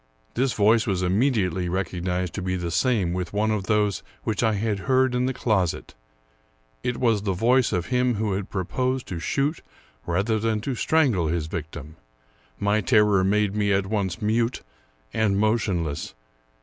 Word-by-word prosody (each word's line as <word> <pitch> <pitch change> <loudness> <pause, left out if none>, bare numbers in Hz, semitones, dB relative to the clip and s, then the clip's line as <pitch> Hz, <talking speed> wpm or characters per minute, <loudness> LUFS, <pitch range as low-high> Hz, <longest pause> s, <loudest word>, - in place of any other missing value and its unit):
This 130 +1 +1
voice 110 +2 +3
was 95 -3 0
immediately 95 -3 +1
recognized 90 -1 -2
to 100 - -4
be 90 0 -1
the 85 -2 -3
same 100 -5 +1
with 90 0 -4
one 110 +1 +1
of 105 -3 -1
those 105 -2 +1 0.2
which 110 -2 -1
I 110 -2 +2
had 105 0 -1
heard 130 -1 +3
in 125 +1 +1
the - - 0
closet; 105 -9 -1 0.9
it 125 - -2
was 115 -5 +2
the 100 -2 -1
voice 120 +6 +3
of 90 -2 -1
him 125 -1 +2
who 105 -1 -1
had 95 0 -3
proposed 125 +7 -2
to 90 - -4
shoot 140 - -1 0.5
rather 100 +6 +1
than 110 0 0
to 135 - -3
strangle 125 - +2
his 80 -1 -1
victim. 80 -1 -7 0.6
My 105 +1 +2
terror 105 -5 +4
made 105 +1 +1
me 105 -1 +1
at 95 0 +2
once 95 -3 -2
mute 115 +3 0 0.5
and 105 -3 +1
motionless. 100 - -1
105 Hz, 165 wpm, -24 LUFS, 90-115 Hz, 0.9 s, terror